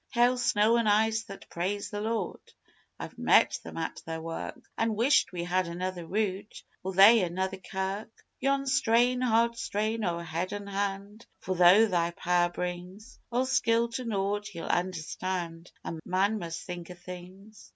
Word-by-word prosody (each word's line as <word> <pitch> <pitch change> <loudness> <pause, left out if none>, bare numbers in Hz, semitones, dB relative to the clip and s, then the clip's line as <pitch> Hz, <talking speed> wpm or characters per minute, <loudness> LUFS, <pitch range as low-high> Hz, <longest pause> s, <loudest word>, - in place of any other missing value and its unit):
(Hail, 245 +1 +4
snow 225 -1 +3
an' 230 - +1
ice 220 +1 +2
that 195 -3 -11
praise 195 +4 -3
the 205 -1 -4
Lord: 225 +1 -2 0.6
I've - - -8
met - - +4
them - - -9
at - - -4
their 160 0 -5
work, 165 0 -6 0.2
An' 225 -1 0
wished 250 +7 +3
we 175 -2 -4
had 180 +1 0
anither 175 0 -4
route 205 0 -3 0.2
or 190 - -3
they 205 +4 +8
anither 190 +2 -2
kirk.) 190 +3 -4 0.3
Yon's 275 0 +1
strain, 245 +2 +3
hard 235 -1 +2
strain, 220 0 -2
o' 175 -3 0
head 170 +2 -3
an' 205 0 -5
hand, 200 +2 -4
for 190 - -3
though 180 +5 +7
Thy 175 -5 +1
Power 175 0 +2
brings 180 +6 -6
All 250 +2 +1
skill 235 -3 +2
to 255 +2 -4
naught, 200 -2 -2
Ye'll 165 - -5
understand 175 -1 -3
a 165 - -5
man 195 +4 +1
must 170 -2 -5
think 175 -1 -7
o' 180 - -8
things. 180 +4 -12
195 Hz, 165 wpm, -29 LUFS, 180-225 Hz, 0.6 s, they